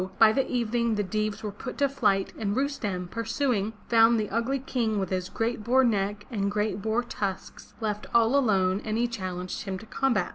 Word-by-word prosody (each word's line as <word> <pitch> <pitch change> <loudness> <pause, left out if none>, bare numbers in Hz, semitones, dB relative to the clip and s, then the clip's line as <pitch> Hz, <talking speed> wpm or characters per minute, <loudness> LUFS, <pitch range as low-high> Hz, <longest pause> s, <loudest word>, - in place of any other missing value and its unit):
by 220 -1 +7
the 270 +4 0
evening 235 -1 0
the 205 - 0
Deevs 215 +2 -2
were 210 - -3
put 230 +5 -7
to 280 - +3
flight 210 -8 +1
and 205 -2 -1
Rustem, 215 -10 -2
pursuing, 230 -2 -1
found 230 0 +5
the 210 - -2
ugly 235 +5 0
King 240 -5 -1
with 190 -2 -2
his 185 0 -1
great 225 -1 -2
boar 255 +4 +4
neck 205 -3 0
and 200 -3 0
great 210 0 -1
boar 220 +3 0
tusks, 195 -5 -5
left 210 -2 -3
all 235 +2 +4
alone, 195 -7 +2
and 215 0 -2
he 240 +1 +2
challenged 185 -5 -4
him 195 -2 -4
to 205 - -11
combat. 220 -5 0
220 Hz, 195 wpm, -27 LUFS, 200-240 Hz, -, by